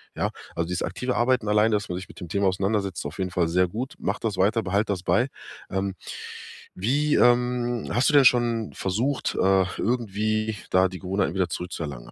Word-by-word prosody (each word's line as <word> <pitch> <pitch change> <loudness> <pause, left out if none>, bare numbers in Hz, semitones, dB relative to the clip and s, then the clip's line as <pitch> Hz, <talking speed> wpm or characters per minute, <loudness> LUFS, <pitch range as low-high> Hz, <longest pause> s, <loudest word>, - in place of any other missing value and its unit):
ja? - - 0 0.3
Also, 85 - -1
dieses 90 0 -2
aktive 125 0 -2
Arbeiten 125 -2 +2
alleine, 105 +1 +3
dass 105 - -2
man 90 - -2
sich 95 - -7
mit - - -14
dem 90 - -7
Thema 100 +3 +1
auseinandersetzt, 95 0 0
ist - - -6
auf 75 +3 -6
jeden 95 -1 -1
Fall 85 -1 +1
sehr 90 +2 +2
gut. 120 +10 -5
Mache - - -2
das 110 -3 -1
weiter, 110 +5 +3
behalte 100 +3 0
das 90 -2 -6
bei, 120 +6 +2 0.4
ähm. 95 0 -2 0.8
Wie, 140 +10 +1
ähm 120 -1 +2
hast 125 - +3
du - - 0
denn 140 -2 +7
schon 120 -3 +3
versucht, 115 +9 -1
äh, 95 0 +3
irgendwie 110 -2 0
da 95 0 +4
die 95 0 -8
Gewohnheiten 95 -1 -1
wieder 95 -2 0
zurückzuerlangen? 75 -7 -5
100 Hz, 200 wpm, -25 LUFS, 90-120 Hz, 0.8 s, denn